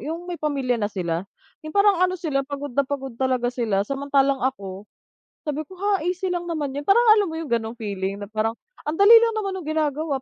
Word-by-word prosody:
yung 330 +4 -5
may 355 -1 -6
pamilya 270 -6 0
na 205 - 0
sila, 180 -2 -3 0.3
yung 310 -1 -9
parang 400 -3 +5
ano 370 0 +2
sila 300 -6 -1
pagod 285 -1 -6
na 280 - +2
pagod 270 -3 -4
talaga 250 -2 +1
sila. 215 -5 0
Samantalang 275 +1 +1
ako, 200 -6 -4 0.5
sabi 300 0 -3
ko, 375 - -14
"Ha? 390 -2 0
Easy 365 +1 -1
lang 350 -1 -2
naman 310 -5 -2
'yon." 290 - -5
Parang 425 +5 +5 0.2
alam 410 - +3
mo 325 - -5
yung 320 - -6
gano'ng 230 -1 -1
feeling 200 -3 -4
na 200 - -7
parang 220 +1 -1 0.3
ang 300 - -1
dali 405 +6 +8
lang 460 0 +3
naman 395 -3 -2
nung 345 - -7
ginagawa 305 -2 -1
285 Hz, 215 wpm, -23 LUFS, 235-345 Hz, 0.5 s, dali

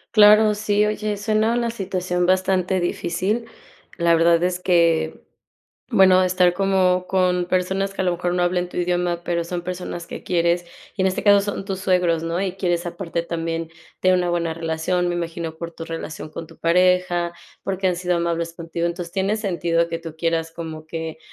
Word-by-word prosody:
Claro, 210 0 +7
sí, 210 0 +1
oye, 210 -1 -2
suena 215 +2 +1
una 240 -1 0
situación 185 -5 -2
bastante 185 0 +2
difícil. 185 +6 -1 0.5
La 170 0 +4
verdad 170 0 +4
es 180 0 -1
que 165 -3 +2 0.6
bueno, 190 -5 +5
estar 180 -1 +3
como 185 -1 +2
con 180 -1 +1
personas 190 +2 0
que - - -1
a - - -1
lo 180 - +2
mejor, 175 0 -2
no 180 - +1
hablen 180 0 0
tu - - -11
idioma, 175 -1 0
pero 170 -1 0
son 175 +1 -4
personas 180 -1 -5
que - - -8
quieres, 170 0 +1 0.3
y - - -4
en 190 - +4
este 185 - -3
caso 205 -1 +6
son 200 -1 -4
tus 195 -1 -4
suegros, 180 -4 +2
¿no? 165 +2 -1
Y 190 -2 -1
quieres 175 -2 -1
aparte, 170 -1 -3
también, 165 -1 -3 0.3
tener 185 0 +4
una 180 -1 0
buena 170 -1 0
relación. 165 +2 -1
Me 175 - -1
imagino 170 -1 -4
por 170 +1 -6
tu 165 - -8
relación 165 -2 -6
con 165 +1 -8
tu 165 0 -16
pareja, 175 0 +2 0.3
porque 190 -1 0
han 180 - 0
sido 180 0 0
amables 170 -1 -1
contigo. 170 0 -3
Entonces, 170 0 -4
tiene 195 +2 0
sentido 170 -5 0
que 165 0 -3
tú 165 -2 -9
quieras, 165 0 -1
como 160 -2 -7
que 160 0 -5
180 Hz, 190 wpm, -22 LUFS, 170-190 Hz, 0.6 s, Claro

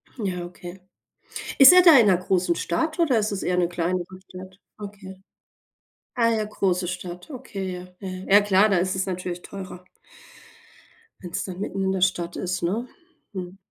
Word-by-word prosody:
Ja, 185 -7 -3
okay. 175 +1 -10 0.8
Ist 275 +5 +10
er 365 - +8
da 335 -5 +8
in 230 - +5
'ner 185 -3 +4
großen 180 -1 0
Stadt 315 - -2
oder 290 -9 +3
ist 210 0 -1
es 195 - -4
eher 180 - 0
'ne 175 -1 +2
kleinere 175 +1 -2 0.2
Stadt? 185 0 -11 0.2
Okay. 195 -2 -10 0.9
Ah 230 -2 +3
ja, 220 -2 0
große 185 -3 -1
Stadt, 180 - -7
okay, 220 -9 -6
ja. 180 0 -8
Ja, 195 - -7
ja. 185 +1 -7
Ja, 205 - +8
klar, 205 +1 +3
da 195 - +2
ist 185 +2 0
es 190 - -1
natürlich 180 -1 -5
teurer. 185 -2 -9 1.4
Wenn's 175 -2 -4
dann 185 -1 -7
mitten 195 -1 -4
in 190 - +1
der 190 -1 -2
Stadt 175 -2 0
ist, 185 0 -3
ne? 210 +8 -2 0.5
Hm. 185 -1 -7
185 Hz, 180 wpm, -24 LUFS, 180-205 Hz, 1.4 s, Ist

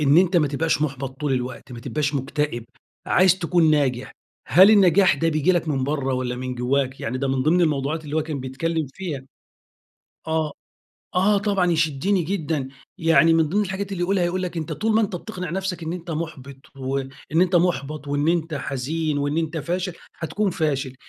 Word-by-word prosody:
إن 145 0 +4
أنت 180 0 +3
ما 150 -4 +3
تبقاش 150 +2 0
مُحبَط 135 -2 -4
طول 145 -2 0
الوقت، 125 0 -4
ما 120 - -8
تبقاش 145 +3 -2
مكتئب 140 -2 -2 0.4
عايز 185 0 +4
تكون 170 -2 +3
ناجح، 135 -4 +1 0.4
هل 185 - +8
النجاح 190 -4 +5
ده 165 +4 0
بييجي 155 +3 +2
لك 175 -2 0
من 135 -3 0
بّره 135 -2 -1
والَّا 125 -1 -2
من 130 0 -4
جوّاك، 130 +2 -1
يعني 125 +3 -3
ده 135 0 -1
من 130 -1 0
ضمن 165 +6 +3
الموضوعات 155 -1 0
اللي 150 +1 -4
هو 160 - +2
كان 150 -3 -4
بيتكلّم 155 +5 -2
فيها، 165 -8 -5 1.1
آه، 160 -1 0 0.6
آه 200 +3 +3
طبعًا 195 -3 +1
يشدّني 165 +4 +1
جدًا، 160 -6 -2 0.3
يعني 165 -1 +5
من 160 -2 +3
ضمن 205 +6 +1
الحاجات 195 0 -4
اللي 180 -2 -2
يقولها، 185 0 +1
يقول 180 +2 -1
لك 180 -2 -4
أنت 160 -2 -3
طول 220 0 0
ما 220 - +5
أنت 200 -4 -1
بتقنع 180 -2 -6
نفسك 190 -1 -3
إن 160 +1 -3
أنت 175 -1 -6
محبِط 150 -4 -5 0.2
وإن 135 0 -3 0.2
أنت 175 +2 +3
محبَط 150 -4 0
وإن 145 +2 0
أنت 165 -2 0
حزين 145 +3 -2
وإن 145 +1 -1
أنت 160 0 -2
فاشل، 180 +4 -2 0.3
هتكون 200 +5 -1
فاشل، 140 -6 -1
155 Hz, 190 wpm, -23 LUFS, 140-180 Hz, 1.1 s, هل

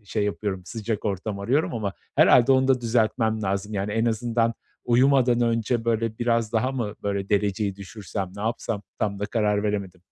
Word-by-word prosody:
şey 105 +1 -1
yapıyorum 100 -2 -3
sıcak 110 0 -4
ortam 100 0 -2
arıyorum 125 +9 0
ama 105 -4 -2 0.2
herhâlde 125 +2 +6
onu 130 0 +3
da 130 -2 +3
düzeltmem 110 -1 +1
lazım. 100 +2 -2
Yani, 100 +1 -2
en 115 +1 +1
azından 115 0 0 0.3
uyumadan 125 0 +4
önce, 115 0 0
böyle, 115 -1 0
biraz 115 -2 +1
daha 125 +3 +1
mı 115 -6 -3
böyle 100 -1 -2
dereceyi 100 -1 0
düşürsem, 100 -1 -6
ne 100 - -6
yapsam? 110 -2 -2 0.2
Tam 100 -2 -1
da 105 - -2
karar 105 -2 +1
veremedim. 100 -4 -3
110 Hz, 170 wpm, -25 LUFS, 100-120 Hz, 0.3 s, herhâlde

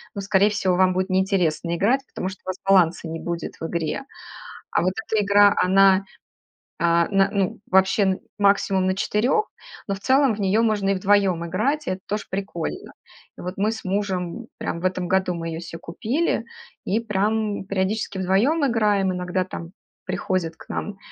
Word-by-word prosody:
ну, 200 - -3
скорее 200 +1 +3
всего, 190 -3 0
вам 185 0 +4
будет 185 +1 -1
неинтересно 180 -4 +1
играть, 235 +10 +2
потому 185 - -4
что 190 - -10
у - - -5
вас 185 - -3
баланса 175 -4 +3
не 165 0 -5
будет 170 -1 -5
в 165 - -3
игре. 165 - -2 0.7
А - - +2
вот 185 +1 +1
эта 215 -2 +1
игра- 205 0 +5
она, 195 +1 +4 0.7
а, 170 0 +3
на 195 -1 +3
ну, 195 -1 -1
вообще 190 0 +3 0.2
максимум 200 -2 +3
на 185 - +1
4, 230 - +1 0.4
но 195 - 0
в 195 - -9
целом 265 +2 +3
в 210 - -7
нее 200 +3 +2
можно 210 -3 +1
и 195 - +3
вдвоем 190 -3 +2
играть, 270 - -1
и - - 0
это 185 0 -3
тоже 210 0 -3
прикольно. 190 -4 -4 0.5
И - - -8
вот 180 +1 -5
мы 210 +3 +1
с 220 - -7
мужем 190 +2 -2
прям 170 - -3
в - - -10
этом 185 -1 -1
году 190 -1 +1
мы 165 0 -4
ее 165 0 -4
се 165 -1 -8
купили 225 - -1 0.4
и 215 +4 0
прям 210 -1 -1
периодически 195 +1 -2
вдвоем 215 - +2
играем. 210 -6 +2
Иногда 180 +1 -1
там 170 -2 -8 0.3
приходят 180 -4 -2
к - - -15
нам 200 -1 -4
195 Hz, 180 wpm, -23 LUFS, 180-205 Hz, 0.7 s, игра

